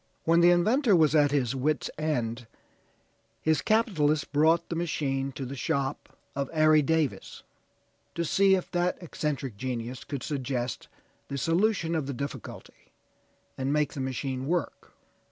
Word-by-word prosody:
When 165 +1 +4
the 170 +1 +6
inventor 210 +6 +4
was 155 -3 +4
at 145 -2 +5
his 135 -3 0
wit's 145 +3 0
end, 120 -6 -2 0.9
his 155 +5 +1
capitalist 160 -10 +1
brought 160 +3 +3
the 170 - -2
machine 140 -5 -1
to 135 - -5
the 135 +2 -6
shop 140 0 -3 0.2
of 140 -1 -2
Ari 155 0 +5
Davis, 155 -1 -1 0.7
to 170 - -1
see 195 +4 +4
if 185 - -4
that 175 0 0
eccentric 145 - -4
genius 125 0 -4
could 140 -3 -5
suggest 130 -4 -3 0.4
the 140 - -4
solution 170 - +1
of 155 -4 -1
the 140 - -3
difficulty, 140 +3 -8 0.7
and 135 +1 -1
make 150 -1 +1
the - - -6
machine 130 0 -3
work. 175 +2 -3
150 Hz, 145 wpm, -28 LUFS, 135-165 Hz, 0.9 s, the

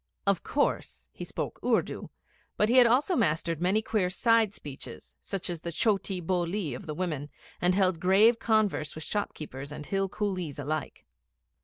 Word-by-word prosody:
Of 200 -3 +2
course, 285 - -1
he - - -7
spoke - - -5
Urdu, - - 0 0.5
but 210 - +3
he 250 - +4
had 250 -2 +8
also 270 +10 +3
mastered 165 -5 +1
many 195 +5 +2
queer 210 -5 +1
side 220 +2 +3
speeches 140 -2 -9 0.2
like 195 -3 -2
the 170 -1 -4
chotee 195 0 +1
bolee 175 -3 -1
of 125 - -8
the 150 - -4
women, 155 -5 -3 0.3
and 180 +1 +3
held 185 -4 +2
grave 205 +6 +5
converse 215 -9 +1
with 155 - -6
shopkeepers 150 -7 -4
and 150 0 -7
Hill 195 +2 0
coolies 185 -8 -3
alike. 145 +1 -4
185 Hz, 160 wpm, -29 LUFS, 155-210 Hz, 0.5 s, had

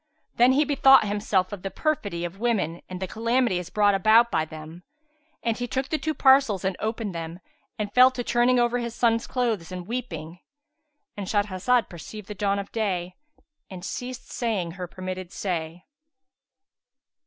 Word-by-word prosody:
Then 245 +2 +6
he 295 +3 +3
bethought 270 -3 +6
himself 200 -2 0
of 200 - -6
the 195 - -4
perfidy 205 - -2
of 175 +3 -7
women 205 -8 0
and 185 -1 -6
the 190 - -2
calamities 230 -4 0
brought 205 -1 +3
about 220 +4 +5
by 155 - +1
them; 155 +2 -10 0.6
and 230 -2 0
he 245 +1 -4
took 265 +2 -2
the 310 - -1
two 310 -1 -2
parcels 265 -9 +4
and 190 -1 0
opened 220 -2 -3
them 165 +1 -6 0.4
and 205 -1 -4
fell 255 +1 +8
to 255 -1 -5
turning 240 +1 +3
over 240 0 +2
his 235 -1 -4
sons' 230 -1 +1
clothes 225 -9 -1
and 180 -1 -6
weeping,—And 250 - -9
Shahrazed 205 +3 +1
perceived 190 +4 -10
the 210 - -5
dawn 200 0 0
of 200 0 -5
day 185 -5 -2 0.6
and 185 -2 -8
ceased 250 +3 -6
saying 210 -8 -2
her 180 +1 -6
permitted 185 0 -6
say. 170 -2 -4
210 Hz, 165 wpm, -25 LUFS, 185-245 Hz, 0.6 s, fell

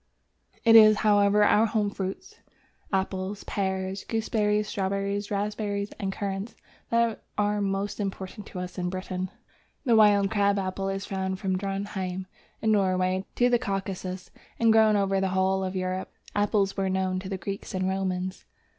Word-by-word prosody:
It 225 0 +7
is, 215 -1 +9
however, 205 0 +5
our 210 +2 +5
home 210 -2 0
fruits, 190 -1 -6 0.5
Apples, 190 +1 -2
Pears, 190 -1 -2
Gooseberries, 210 -2 0
Strawberries, 200 +1 -2
Raspberries, 205 0 -2
and 195 -2 -2
Currants, 195 +2 -4 0.3
that 235 -1 +1
are 210 0 +1
most 195 +1 -2
important 195 0 -5
to - - -9
us 180 +1 -5
in 180 0 -1
Britain. 185 0 -4 0.6
The 235 -3 +4
Wild 205 -2 +5
Crab 200 -1 +2
Apple 195 0 -2
is 195 0 -3
found 190 -1 -2
from 190 -1 -1
Drontheim, 190 -1 -3 0.4
in 220 - +3
Norway, 185 -2 +1
to 245 - +4
the 245 -1 +3
Caucasus, 190 -2 -4 0.3
and 230 -1 +5
grows 220 -1 +5
over 195 -1 +1
the 190 - +1
whole 190 0 +2
of 190 0 -3
Europe. 185 0 -2 0.2
Apples 205 -1 +1
were 195 -1 0
known 185 0 0
to 190 0 -7
the 195 - -2
Greeks 195 +1 -6
and 185 0 0
Romans. 190 -1 -2
195 Hz, 155 wpm, -27 LUFS, 190-205 Hz, 0.6 s, is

